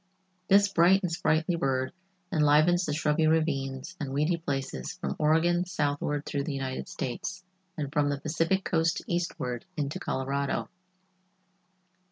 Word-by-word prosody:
This 200 Hz, +1 st, +6 dB
bright 190 Hz, +1 st, +4 dB
and 180 Hz, -, -1 dB
sprightly 160 Hz, +1 st, +1 dB
bird 135 Hz, -2 st, 0 dB, 0.4 s
enlivens 155 Hz, +4 st, +4 dB
the 150 Hz, -, -2 dB
shrubby 155 Hz, 0 st, +2 dB
ravines 140 Hz, -4 st, 0 dB
and 140 Hz, -3 st, -4 dB
weedy 150 Hz, +5 st, +1 dB
places 135 Hz, -, -3 dB
from 70 Hz, -, -4 dB
Oregon 165 Hz, +3 st, +3 dB
southward 145 Hz, -4 st, -1 dB
through 140 Hz, -1 st, -2 dB
the 150 Hz, -3 st, -3 dB
United 130 Hz, -1 st, -4 dB
States, 180 Hz, +9 st, -4 dB, 0.3 s
and 145 Hz, -2 st, -4 dB
from 145 Hz, -2 st, +2 dB
the 140 Hz, -1 st, -1 dB
Pacific 165 Hz, +6 st, 0 dB
coast 165 Hz, -1 st, +1 dB
eastward 130 Hz, -9 st, -2 dB
into 145 Hz, -1 st, -2 dB
Colorado. 140 Hz, +1 st, -2 dB
150 Hz, 135 wpm, -28 LUFS, 140-170 Hz, 0.4 s, This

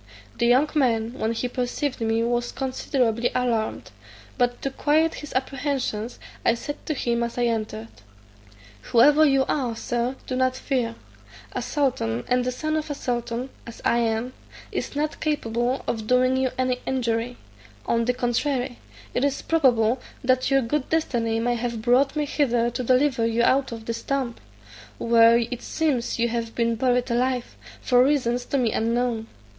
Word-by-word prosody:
The 235 Hz, -, +3 dB
young 255 Hz, +5 st, +5 dB
man, 235 Hz, -6 st, +1 dB
when 225 Hz, -3 st, -1 dB
he 240 Hz, +2 st, -2 dB
perceived 250 Hz, +2 st, -2 dB
me 225 Hz, 0 st, +1 dB
was 240 Hz, 0 st, 0 dB
considerably 250 Hz, -3 st, 0 dB
alarmed; 235 Hz, -3 st, -1 dB, 0.4 s
but 245 Hz, -1 st, +1 dB
to 275 Hz, -, -1 dB
quiet 310 Hz, +4 st, +2 dB
his 295 Hz, -, -8 dB
apprehensions, 260 Hz, -4 st, -2 dB, 0.3 s
I 230 Hz, -, +3 dB
said 290 Hz, +5 st, -6 dB
to 310 Hz, -, -1 dB
him 235 Hz, -3 st, 0 dB
as 235 Hz, 0 st, -3 dB
I 245 Hz, -, +1 dB
entered, 215 Hz, -, -2 dB, 1.0 s
"Whoever 290 Hz, +6 st, +6 dB
you 270 Hz, -1 st, +3 dB
are, 250 Hz, -6 st, -1 dB
Sir, 240 Hz, +3 st, -2 dB
do 255 Hz, -, -3 dB
not 255 Hz, 0 st, +1 dB
fear; 250 Hz, -4 st, -1 dB, 0.6 s
a -, -, -3 dB
sultan, 125 Hz, -, -1 dB
and 250 Hz, 0 st, +2 dB
the 250 Hz, -, -1 dB
son 310 Hz, +5 st, -2 dB
of 310 Hz, 0 st, -3 dB
a 290 Hz, -, -2 dB
sultan, 240 Hz, 0 st, -3 dB, 0.2 s
as 230 Hz, -, -9 dB
I 235 Hz, -, +3 dB
am, 230 Hz, +2 st, -1 dB, 0.4 s
is -, -, -4 dB
not 300 Hz, +1 st, -2 dB
capable 245 Hz, -4 st, -1 dB
of 220 Hz, -2 st, -3 dB
doing 255 Hz, +1 st, +3 dB
you 260 Hz, 0 st, +1 dB
any 255 Hz, -1 st, 0 dB
injury: 245 Hz, -2 st, -1 dB, 0.5 s
on 230 Hz, 0 st, +1 dB
the 250 Hz, -, +2 dB
contrary, 245 Hz, +1 st, -1 dB, 0.3 s
it 250 Hz, -, 0 dB
is 280 Hz, -1 st, 0 dB
probable 250 Hz, -6 st, +3 dB, 0.2 s
that 255 Hz, 0 st, +2 dB
your 270 Hz, -1 st, +3 dB
good 260 Hz, +4 st, -1 dB
destiny 235 Hz, -8 st, 0 dB
may 240 Hz, +1 st, +1 dB
have 235 Hz, -1 st, -2 dB
brought 260 Hz, +4 st, +3 dB
me 300 Hz, -1 st, 0 dB
hither 240 Hz, -5 st, +1 dB
to 250 Hz, -, -3 dB
deliver 255 Hz, 0 st, +2 dB
you 230 Hz, +1 st, +1 dB
out 265 Hz, +1 st, +3 dB
of 225 Hz, -1 st, -7 dB
this 230 Hz, 0 st, -3 dB
tomb, 270 Hz, -4 st, -1 dB, 0.6 s
where 230 Hz, 0 st, +5 dB
it 235 Hz, +1 st, -2 dB
seems 290 Hz, -7 st, -1 dB
you 235 Hz, 0 st, +2 dB
have 230 Hz, -1 st, -3 dB
been 235 Hz, -1 st, +1 dB
buried 250 Hz, 0 st, +1 dB
alive, 250 Hz, +1 st, 0 dB, 0.3 s
for 250 Hz, 0 st, +4 dB
reasons 250 Hz, -3 st, +1 dB
to 280 Hz, -, -1 dB
me 240 Hz, -4 st, +1 dB
unknown. 230 Hz, 0 st, 0 dB
245 Hz, 170 wpm, -24 LUFS, 235-265 Hz, 1.0 s, Whoever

